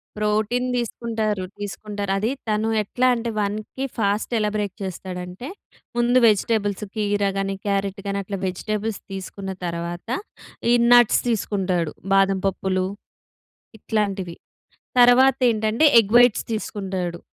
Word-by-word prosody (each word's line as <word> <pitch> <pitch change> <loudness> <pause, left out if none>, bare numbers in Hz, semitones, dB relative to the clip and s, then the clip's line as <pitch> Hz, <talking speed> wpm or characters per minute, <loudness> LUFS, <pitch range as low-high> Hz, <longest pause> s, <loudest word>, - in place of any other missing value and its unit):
Protein 215 +4 0
దీసుకుంటారు. 225 -4 -2 0.2
తీసుకుంటారు. 205 0 -4
అది 215 +5 0 0.2
తను 215 +1 +1
ఎట్లా 250 +5 0
అంటే, 235 0 -3
1కి 210 +5 -3
ఫాస్ట్ 205 0 0
ఎలా 210 -1 +1
బ్రేక్ 205 -2 -3
చేస్తాడంటే, 180 +3 -6 0.5
ముందు 240 +1 +3
వెజిటబుల్స్ 210 -1 +1
కీర 205 -1 0
గానీ, 195 0 -1
క్యారట్ 200 0 -1
గానీ, 200 0 -1
అట్లా 195 0 -5
వెజిటబుల్స్ 215 +3 -3
తీసుకున్న 195 0 -6 0.2
తరవాత, 170 +2 -5 0.6
ఈ - - +6 0.2
నట్స్ 240 -2 +6
తీసుకుంటాడు. 190 -7 -1 0.2
బాదం 195 0 +3
పప్పులు 185 -1 -1 0.9
ఇట్లాంటివి. 200 -5 -2 0.6
తరవాతేంటంటే, 245 -1 +4 0.2
ఎగ్ 210 0 -6
వైట్స్ 245 -2 +5
తీసుకుంటాడు 190 -5 -4
205 Hz, 110 wpm, -23 LUFS, 195-225 Hz, 0.9 s, ఈ